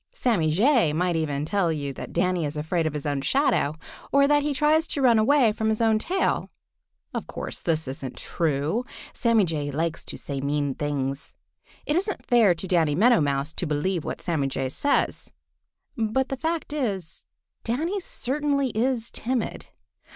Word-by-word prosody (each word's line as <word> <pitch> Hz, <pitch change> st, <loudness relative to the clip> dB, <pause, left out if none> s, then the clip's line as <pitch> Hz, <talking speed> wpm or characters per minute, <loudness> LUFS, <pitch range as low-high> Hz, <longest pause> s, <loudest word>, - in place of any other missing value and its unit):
Sammy 215 Hz, -, +1 dB
Jay 215 Hz, -, +3 dB
might 175 Hz, +2 st, +1 dB
even 150 Hz, -3 st, -1 dB
tell 180 Hz, 0 st, +1 dB
you 145 Hz, -3 st, -3 dB
that -, -, -8 dB
Danny 180 Hz, 0 st, +1 dB
is 150 Hz, 0 st, -3 dB
afraid 160 Hz, +2 st, 0 dB
of 155 Hz, -, -3 dB
his 150 Hz, -, -4 dB
own 145 Hz, -2 st, -1 dB
shadow, 210 Hz, -, +2 dB, 0.4 s
or 280 Hz, 0 st, +5 dB
that 290 Hz, 0 st, +4 dB
he 295 Hz, +1 st, -1 dB
tries 305 Hz, +3 st, +2 dB
to -, -, -1 dB
run 235 Hz, -3 st, +5 dB
away 245 Hz, 0 st, +4 dB
from 220 Hz, +1 st, -1 dB
his 220 Hz, -, 0 dB
own 220 Hz, -2 st, +3 dB
tail. 375 Hz, -, 0 dB, 0.6 s
Of -, -, -4 dB
course -, -, -6 dB
this 160 Hz, -3 st, 0 dB
isn't 130 Hz, -1 st, -6 dB
true. 160 Hz, -, -1 dB, 0.3 s
Sammy 230 Hz, -4 st, +3 dB
Jay 150 Hz, -4 st, -2 dB
likes 160 Hz, +3 st, -2 dB
to -, -, -7 dB
say 140 Hz, -2 st, -4 dB
mean 145 Hz, 0 st, 0 dB
things. 140 Hz, -1 st, -3 dB, 0.5 s
It 295 Hz, -, 0 dB
isn't 390 Hz, +3 st, -2 dB
fair 225 Hz, -7 st, +5 dB
to 190 Hz, -, -5 dB
Danny 165 Hz, -5 st, +2 dB
Meadow 230 Hz, +3 st, +5 dB
Mouse 140 Hz, +1 st, -1 dB
to 175 Hz, -, -2 dB
believe 155 Hz, +3 st, -1 dB
what -, -, -5 dB
Sammy 155 Hz, -6 st, 0 dB
Jay 135 Hz, -1 st, -2 dB
says. 285 Hz, -, 0 dB, 0.7 s
But 230 Hz, +3 st, 0 dB
the 270 Hz, -, -1 dB
fact 325 Hz, 0 st, -2 dB
is 200 Hz, -, -3 dB, 0.4 s
Danny 320 Hz, -, -1 dB
certainly 280 Hz, -4 st, -1 dB
is 235 Hz, +1 st, 0 dB
timid. 245 Hz, 0 st, -3 dB
185 Hz, 175 wpm, -25 LUFS, -, 0.7 s, or